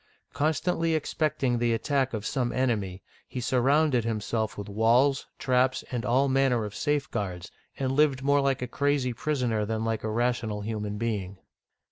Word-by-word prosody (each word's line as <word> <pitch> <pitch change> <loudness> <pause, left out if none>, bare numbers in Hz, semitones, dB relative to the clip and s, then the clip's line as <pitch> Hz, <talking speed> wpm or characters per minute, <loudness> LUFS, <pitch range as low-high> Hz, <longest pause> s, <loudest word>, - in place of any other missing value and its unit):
Constantly 160 +3 +1
expecting 150 -5 0
the 120 -1 +2
attack 135 +2 0
of 110 -2 -4
some 125 -4 -1
enemy, 105 -8 -1 0.2
he 130 - -5
surrounded 130 +1 +2
himself 110 -1 -2
with 100 0 -6
walls, 115 +6 +3
traps, 130 0 +1
and 120 -2 -2
all 130 +3 +2
manner 130 -4 +2
of 105 - -7
safeguards, 110 - -2 0.3
and 130 -1 -1
lived 135 -2 +2
more 140 +1 +3
like 135 -2 0
a - - -2
crazy 140 -1 0
prisoner 125 -5 -1
than 110 +1 -2
like 115 -1 -1
a 110 - -2
rational 115 -2 -1
human 105 -1 -3
being. 100 -4 -3
125 Hz, 155 wpm, -27 LUFS, 110-135 Hz, 0.3 s, walls